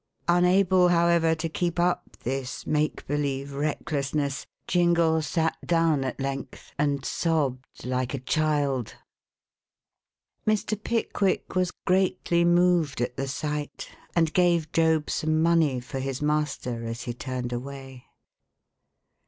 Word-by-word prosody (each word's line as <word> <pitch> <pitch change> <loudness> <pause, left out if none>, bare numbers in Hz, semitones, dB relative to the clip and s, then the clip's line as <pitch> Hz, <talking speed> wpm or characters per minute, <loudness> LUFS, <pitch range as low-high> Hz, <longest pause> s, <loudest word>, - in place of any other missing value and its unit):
Unable, 180 +1 +4
however, 170 -1 +3
to 160 +1 -3
keep 175 +2 -2
up 175 +1 0
this 130 0 -3
make 150 0 0
believe 140 -1 -2
recklessness, 140 -1 -2 0.2
Jingle 170 -2 +3
sat 160 +2 0
down 165 -4 +2
at 130 0 -4
length 135 0 -5
and 140 -2 0
sobbed 140 -8 -1
like 125 +1 -1
a - - -4
child. 140 -3 0 1.5
Mr. 215 0 +1
Pickwick 210 -4 -1
was 185 -1 +2 0.2
greatly 180 -2 +2
moved 175 -4 +3
at 120 0 -2
the 135 0 -3
sight, 150 +2 -4 0.3
and 165 -2 +2
gave 170 -3 +2
Job 160 -2 +2
some 155 0 0
money 160 -5 +3
for 125 +2 -6
his 135 0 -3
master 150 -5 -1
as 115 +1 -5
he 120 - -4
turned 125 +1 -4
away. 135 0 -7
150 Hz, 120 wpm, -26 LUFS, 135-170 Hz, 1.5 s, Unable